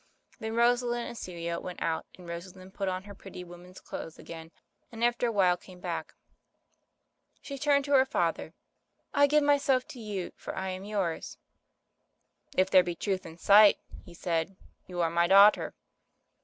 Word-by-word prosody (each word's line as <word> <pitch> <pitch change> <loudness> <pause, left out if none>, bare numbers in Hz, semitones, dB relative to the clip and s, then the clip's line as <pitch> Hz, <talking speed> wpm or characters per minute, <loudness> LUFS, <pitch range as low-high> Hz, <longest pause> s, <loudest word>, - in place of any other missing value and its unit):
Then 220 -1 -4
Rosalind 240 0 +2
and - - -8
Celia 170 -4 -5
went 180 -1 -7
out, 160 -1 -2
and 180 -2 -13
Rosalind 185 +2 -9
put 195 -1 -3
on 185 0 -3
her 200 0 -10
pretty 190 -2 -10
woman's 180 +1 -13
clothes 160 - -8
again, 160 -1 -10 0.4
and 230 0 -5
after 240 0 +2
a - - 0
while 185 -4 +3
came 180 0 -15
back. - - -5 1.2
She 275 -1 -8
turned 280 0 +2
to 285 - -5
her 265 -2 +6
father 170 -9 -2 0.3
— - - -47
"I 285 0 +5
give 300 +1 +3
myself 280 -3 +2
to 255 - -9
you, 205 -5 -5
for - - -7
I 190 0 -3
am 185 +1 -6
yours.' 195 -6 -3 1.2
"If 185 0 +3
there 185 - +8
be 175 -1 -4
truth 190 +1 -3
in 165 0 -12
sight," 205 +3 +7 0.3
he 175 - -14
said, 170 +1 -2 0.3
"you 180 -1 -3
are 165 -1 +1
my 170 0 +2
daughter." 200 +3 +6
190 Hz, 175 wpm, -29 LUFS, 175-235 Hz, 1.2 s, there